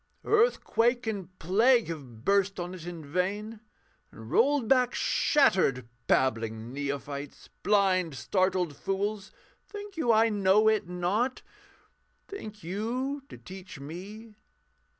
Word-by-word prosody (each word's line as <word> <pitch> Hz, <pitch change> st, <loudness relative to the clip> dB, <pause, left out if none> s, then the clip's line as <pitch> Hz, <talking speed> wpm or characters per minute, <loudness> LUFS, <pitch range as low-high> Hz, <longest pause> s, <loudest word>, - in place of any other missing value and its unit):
Earthquake 255 Hz, -, +2 dB
and 190 Hz, -4 st, -5 dB
plague 225 Hz, +8 st, +3 dB
have 130 Hz, -8 st, -8 dB
burst 200 Hz, -1 st, +2 dB
on 175 Hz, +1 st, -4 dB
it 175 Hz, -2 st, -9 dB
in 170 Hz, -3 st, -7 dB
vain 200 Hz, +8 st, -2 dB, 0.5 s
And 110 Hz, +1 st, -12 dB
rolled 275 Hz, -1 st, +3 dB
back 250 Hz, 0 st, +3 dB
shattered 175 Hz, -, +2 dB, 0.2 s
Babbling 115 Hz, -2 st, 0 dB
neophytes! 140 Hz, 0 st, -5 dB
Blind, 185 Hz, -6 st, +2 dB
startled 185 Hz, -1 st, 0 dB
fools 200 Hz, +3 st, -3 dB, 0.4 s
think 410 Hz, -3 st, -9 dB
you 245 Hz, -8 st, +2 dB
I 225 Hz, +1 st, +4 dB
know 205 Hz, +1 st, +3 dB
it 215 Hz, -5 st, +2 dB
not? 195 Hz, +9 st, -1 dB, 0.8 s
Think 215 Hz, -, -9 dB
you 240 Hz, -, -3 dB
to -, -, -10 dB
teach 185 Hz, -4 st, -11 dB
me? 200 Hz, +10 st, -9 dB
195 Hz, 115 wpm, -28 LUFS, 165-225 Hz, 0.8 s, I